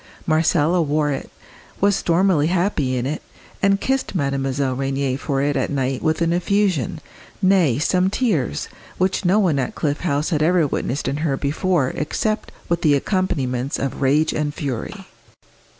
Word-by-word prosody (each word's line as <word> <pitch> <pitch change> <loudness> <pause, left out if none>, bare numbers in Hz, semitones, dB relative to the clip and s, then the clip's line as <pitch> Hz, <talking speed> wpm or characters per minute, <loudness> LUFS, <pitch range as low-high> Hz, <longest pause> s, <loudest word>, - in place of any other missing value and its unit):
Marcella 160 +1 +2
wore 150 -1 +1
it, 135 - -4 0.5
was 200 0 +3
stormily 170 -4 +2
happy 170 -8 0
in 125 - -2
it, 150 +3 -3 0.4
and 195 0 +3
kissed 265 -4 -1
Mademoiselle 135 -3 -1
Rénier 135 0 -1
for 140 -2 -1
it 145 0 0
at 130 - 0
night 135 -2 -1
with 160 +1 +1
an 165 0 +1
effusion, 180 - 0 0.4
nay, 185 -10 +3
some 180 +5 +2
tears, 185 - -1 0.3
which 190 +1 0
no 185 +4 +4
one 175 -9 +2
at 130 - -3
Cliff 145 -1 -1
House 150 -2 -1
had 155 -2 +1
ever 170 +1 +3
witnessed 140 -1 -2
in 140 - -1
her 150 -3 0
before 150 0 0
except 215 +10 -2 0.2
with 170 -1 0
the 150 -3 +4
accompaniments 140 - -1
of 135 0 -3
rage 150 +4 +2
and 150 -1 -2
fury. 130 -6 -5
150 Hz, 160 wpm, -21 LUFS, 135-180 Hz, 0.5 s, no